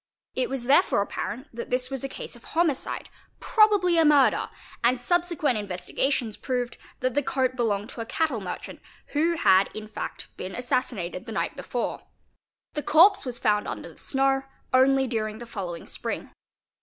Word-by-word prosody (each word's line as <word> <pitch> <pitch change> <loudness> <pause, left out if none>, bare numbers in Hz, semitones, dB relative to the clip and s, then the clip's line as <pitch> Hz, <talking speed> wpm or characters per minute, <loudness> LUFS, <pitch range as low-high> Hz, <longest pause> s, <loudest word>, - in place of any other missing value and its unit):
It 255 - -1
was 265 -2 -3
therefore 245 -5 +4
apparent 235 +5 -5
that 235 - -5
this 255 +1 0
was 270 -1 -1
a 275 - -2
case - - -6
of 240 - -16
homicide, 320 -3 -1 0.3
probably 410 -6 +4
a - - +6
murder, 295 -3 +4 0.3
and 245 +2 +3
subsequent 325 -3 +1
investigations 210 +4 -1
proved 245 -2 -3 0.2
that 255 0 +1
the 290 - +2
coat 260 -2 0
belonged 215 -4 -1
to 230 - -6
a - - -4
cattle 290 -6 0
merchant 190 - -6 0.3
who 325 +3 +1
had 190 - +5
in 215 0 -6
fact 215 - -7
been 185 +1 -6
assassinated 240 -6 -2
the - - -5
night 220 - -2
before. - - -3 0.7
The 295 - -2
corpse 365 +3 +5
was 245 -1 -2
found 210 -1 +1
under - - -5
the - - -16
snow 270 0 +1 0.3
only 265 +1 +5
during 215 -3 -2
the 240 - -8
following 185 -7 -6
spring. - - -5
255 Hz, 170 wpm, -26 LUFS, 220-285 Hz, 0.7 s, a